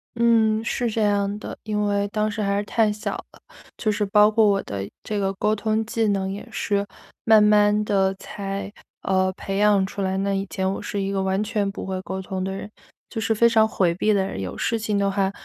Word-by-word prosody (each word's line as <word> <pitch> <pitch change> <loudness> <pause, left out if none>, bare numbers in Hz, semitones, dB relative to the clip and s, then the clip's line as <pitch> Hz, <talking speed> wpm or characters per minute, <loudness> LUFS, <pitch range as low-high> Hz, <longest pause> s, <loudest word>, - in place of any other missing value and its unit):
嗯， 225 -2 +3
是 240 0 -1
这 220 0 -1
样 205 0 +1
的， - - -7
因 210 -1 -1
为 200 0 +1
当 215 +1 -1
时 215 +1 -4
还 200 0 0
是 205 - 0
太 215 0 +1
小 210 +1 -4 0.2
了。 - - -19 0.4
就 215 - 0
是 210 0 0
包 210 +2 +5
括 220 -1 +4
我 195 -1 +2
的 100 0 -5 0.2
这 210 -1 -2
个 195 0 0
沟 215 +2 +1
通 220 +1 -1
技 225 -1 0
能 195 -1 0
也 200 - -7
是 200 0 -1 0.4
慢 220 -1 +6
慢 210 0 +4
地 195 -2 +2
才， 195 0 -6 0.3
呃， 185 -1 +1
培 195 +1 -4
养 205 -2 +4
出 200 +1 -6
来， 190 0 -1
那 195 0 0
以 195 0 -1
前 190 0 -1
我 - - -5
是 200 - -3
一 195 0 -2
个 195 -1 0
完 190 +2 0
全 210 -2 -1
不 - - -7
会 190 -1 -3
沟 190 0 -5
通 185 0 -4
的 190 - -2
人， 195 +2 -6 0.4
就 225 - -4
是 220 +1 +1
非 235 +2 +5
常 220 -1 +4
回 180 -5 +1
避 215 +5 +1
的 195 -2 +2
人。 95 - -5
有 95 - -5
事 230 -1 0
情 210 -1 -1
的 200 0 +2
话， 195 -1 0
205 Hz, 255 characters per minute, -23 LUFS, 195-215 Hz, 0.4 s, 慢